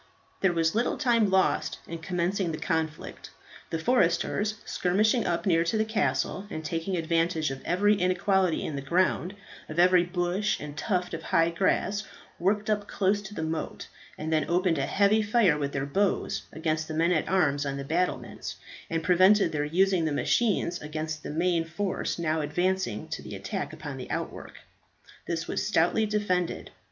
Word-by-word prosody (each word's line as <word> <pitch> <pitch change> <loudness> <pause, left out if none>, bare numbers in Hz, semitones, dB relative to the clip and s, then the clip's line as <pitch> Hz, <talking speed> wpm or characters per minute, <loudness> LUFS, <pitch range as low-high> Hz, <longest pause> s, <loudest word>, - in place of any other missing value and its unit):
There 190 - +3
was 165 -1 +1
little 235 +3 0
time 235 -7 +3
lost 190 0 +1
in 165 0 -6
commencing 180 +1 -1
the 155 - -4
conflict. 160 -1 -3 0.4
The 165 - -1
foresters, 205 +1 +1
skirmishing 215 +6 +1
up 170 +2 -1
near 165 -4 +3
to 220 - 0
the 215 - +2
castle, 190 -2 -1
and 160 0 -6
taking 165 +4 -2
advantage 165 -2 0
of 135 0 -6
every 205 +4 +3
inequality 185 -1 +1
in 150 - -4
the 140 - -3
ground, 180 +5 +1 0.3
of 155 - -7
every 180 0 +6
bush 175 +3 -1
and 150 -1 -7
tuft 180 +1 -1
of 165 - -4
high 165 +1 +2
grass, 195 +3 0 0.4
worked 205 +4 +1
up 210 -1 0
close 200 +1 +1
to 205 +1 -9
the 160 - -3
moat, 160 0 -4 0.3
and 160 +1 -3
then 155 -2 +1
opened 175 -2 +2
a 135 - 0
heavy 205 +2 +3
fire 210 -6 +3
with 145 -1 -2
their 135 -1 -2
bows 195 +7 0
against 155 -1 -2
the 155 - -5
men 165 +2 +2
at 160 -4 +1
arms 150 -7 +2
on 140 -1 -3
the 140 - -4
battlements, 175 +5 -2 0.3
and 165 0 -1
prevented 185 +1 +5
their 150 -1 -1
using 180 +2 +2
the 155 - 0
machines 180 +2 +1
against 155 +1 -4
the - - -7
main 170 +2 +1
force 185 +4 -3
now 160 -2 0
advancing 175 - -1
to - - -4
the - - -8
attack - - -4
upon - - -7
the - - -8
outwork. - - -5 0.7
This 165 -1 -2
was - - -1
stoutly 210 +2 +2
defended. 195 -5 -1
175 Hz, 175 wpm, -27 LUFS, 160-195 Hz, 0.7 s, every